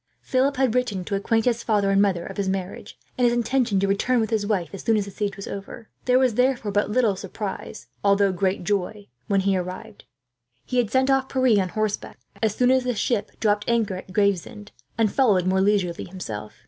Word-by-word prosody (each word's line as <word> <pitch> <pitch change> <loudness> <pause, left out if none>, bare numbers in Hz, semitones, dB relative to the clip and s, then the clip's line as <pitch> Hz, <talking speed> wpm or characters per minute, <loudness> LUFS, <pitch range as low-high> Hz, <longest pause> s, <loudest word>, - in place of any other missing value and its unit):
Philip 265 +1 +1
had 260 -4 +2
written 245 -7 -1
to - - -5
acquaint 225 +3 +1
his 235 -2 +1
father 205 -4 +1
and 195 0 +4
mother 190 -4 +1
of 195 - -8
his 200 -1 -1
marriage, 190 0 -5 0.2
and - - +2
his 240 0 +4
intention 240 -3 +1
to 195 - +1
return 235 +6 +1
with 220 0 -1
his 210 -2 0
wife 180 -7 -1
as 195 - -6
soon 225 -1 +2
as 205 - -1
the 200 - -9
siege 205 +1 -3
was 195 - -8
over. 200 +3 -8 0.2
There 250 0 +4
was 255 -3 +3
therefore 250 -3 +1
but 205 +1 +1
little 215 -2 +2
surprise, 195 +2 -6 0.2
although 200 -1 +3
great 185 +1 -1
joy, 205 +1 -2 0.2
when 195 -1 +2
he 195 0 +1
arrived. 185 +4 -6 0.6
He 250 - -3
had 240 -4 +2
sent 260 +3 +2
off 270 0 +1
Pierre 255 -6 +3
on 185 - -2
horseback, 215 +1 -3 0.2
as 220 -2 +1
soon 250 0 +3
as 260 -1 +3
the 250 -1 -1
ship 220 -1 -2
dropped 210 -1 +1
anchor 230 -4 +1
at 185 - -10
Gravesend, 200 +1 -1 0.3
and 220 -3 +2
followed 205 -10 +3
more 190 +1 +2
leisurely 195 -4 +1
himself. 110 - -7
205 Hz, 215 wpm, -24 LUFS, 195-235 Hz, 0.6 s, and